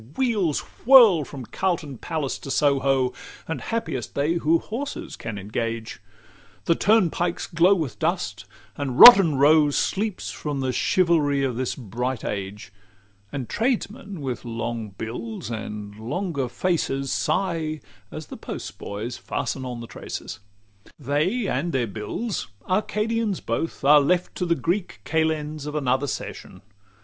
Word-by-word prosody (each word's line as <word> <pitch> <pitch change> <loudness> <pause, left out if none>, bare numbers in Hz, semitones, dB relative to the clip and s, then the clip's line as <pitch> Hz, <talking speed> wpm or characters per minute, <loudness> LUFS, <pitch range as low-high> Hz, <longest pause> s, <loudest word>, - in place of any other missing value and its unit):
Wheels 210 - +1 0.3
whirl 230 - +8
from 135 -2 -8
Carlton 160 - -2
palace 155 -5 -3
to - - -9
Soho, 135 -3 +2 0.3
And 160 - -3
happiest 225 - -3
they 145 +4 +1
who 165 -1 +3
horses 245 +11 -5
can 110 -3 -6
engage; 110 +3 -4 0.6
The 170 - +4
turnpikes 175 -3 +2
glow 175 +4 +4
with 155 - -4
dust; - - -1 0.3
and 135 -3 -3
Rotten 195 - +11
Row 150 +2 +5
Sleeps 200 +7 -1
from 145 -2 -4
the 130 -1 -1
chivalry 155 -6 +2
of 130 -3 -1
this 130 0 -2
bright 125 +1 -4
age; 100 0 -5 0.6
And 135 -4 -4
tradesmen, 220 - -2
with 130 -3 -4
long 115 -2 -4
bills 110 +2 -6
and 105 -2 -6
longer 140 - -2
faces, 135 -4 -1
Sigh 165 -5 -1 0.3
as 155 0 -7
the - - -9
postboys 110 +4 -6
fasten 130 - -3
on 120 -2 -5
the - - -7
traces. 110 - -7 0.6
XLV 140 - -15
They 165 - +1
and 150 +7 -1
their 130 -4 +1
bills, 115 - -4 0.2
"Arcadians 210 +1 0
both," 115 +8 -3
are 145 +1 +7
left 180 +5 +1
To 180 - -1
the 170 - +3
Greek 175 +3 -2
kalends 155 -2 -1
of 150 - -5
another 135 -1 +1
session. 95 -7 -6
145 Hz, 140 wpm, -24 LUFS, 125-175 Hz, 0.6 s, Rotten